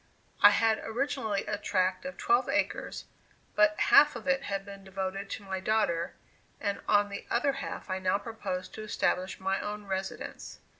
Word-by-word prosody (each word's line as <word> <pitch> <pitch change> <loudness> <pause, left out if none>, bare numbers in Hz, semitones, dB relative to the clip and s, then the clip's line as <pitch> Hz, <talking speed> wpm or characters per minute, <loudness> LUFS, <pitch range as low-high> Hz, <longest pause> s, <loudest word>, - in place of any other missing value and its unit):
I - - +11
had 225 -1 +3
originally 225 -4 -1
a 210 -1 -2
tract 185 +4 0
of 275 - -6
twelve 395 +1 +2
acres, - - -1 0.5
but 210 0 +4
half 295 -1 +7
of 235 0 -7
it 270 0 +3
had 195 -1 -3
been 200 -1 -10
devoted 195 +1 -4
to 205 - -5
my 190 -1 -3
daughter, 190 -4 0 0.4
and 200 0 -2
on 205 -1 +4
the 200 - -7
other 265 +4 +2
half 275 0 -6
I 185 -1 -2
now 185 +1 +2
proposed 200 -3 -5
to - - -7
establish 190 -3 -1
my 190 0 0
own 210 0 -5
residence. 190 0 -5
205 Hz, 170 wpm, -30 LUFS, 190-220 Hz, 0.5 s, I